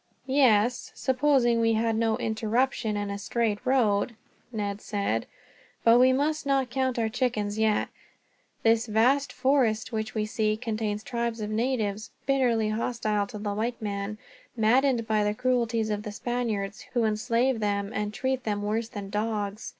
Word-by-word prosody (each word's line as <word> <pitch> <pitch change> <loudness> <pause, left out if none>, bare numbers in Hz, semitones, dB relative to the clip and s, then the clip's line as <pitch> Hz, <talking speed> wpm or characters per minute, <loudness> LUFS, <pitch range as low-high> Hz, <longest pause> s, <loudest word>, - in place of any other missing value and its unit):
"Yes, 250 -4 +3
supposing 260 -3 +2
we 225 0 +3
had 225 0 +1
no 225 0 +1
interruption 220 -1 0
and 205 0 -3
a 200 - -4
straight 215 0 -1
road," 235 -4 +2 0.4
Ned 205 -2 -3
said. 200 - -2 0.6
"But 230 +1 +6
we 255 +1 +6
must 300 +4 0
not 270 -3 +1
count 260 -1 0
our 225 -1 +1
chickens 220 -3 -1
yet. 220 -1 +2 0.7
This 225 +1 +3
vast 250 +5 +2
forest 250 -4 +1
which 220 -1 -3
we 215 -1 0
see 215 0 0
contains 215 -2 -3
tribes 235 -1 -2
of 210 0 -4
natives, 220 -3 -1 0.2
bitterly 245 -5 +2
hostile 215 -2 -1
to 210 - -8
the 205 -1 -3
white 230 +4 -2
man, 205 0 -4 0.4
maddened 240 +2 +3
by 215 -1 +2
the 210 0 0
cruelties 235 -3 0
of 210 -1 -1
the 210 -1 -6
Spaniards, 220 -3 -3
who 240 - +3
enslave 230 +3 +1
them 200 -1 -1
and 210 0 -2
treat 260 +3 -2
them 205 -2 -2
worse 220 +2 -1
than 200 -3 -7
dogs. 210 -1 -2
225 Hz, 160 wpm, -27 LUFS, 210-245 Hz, 0.7 s, But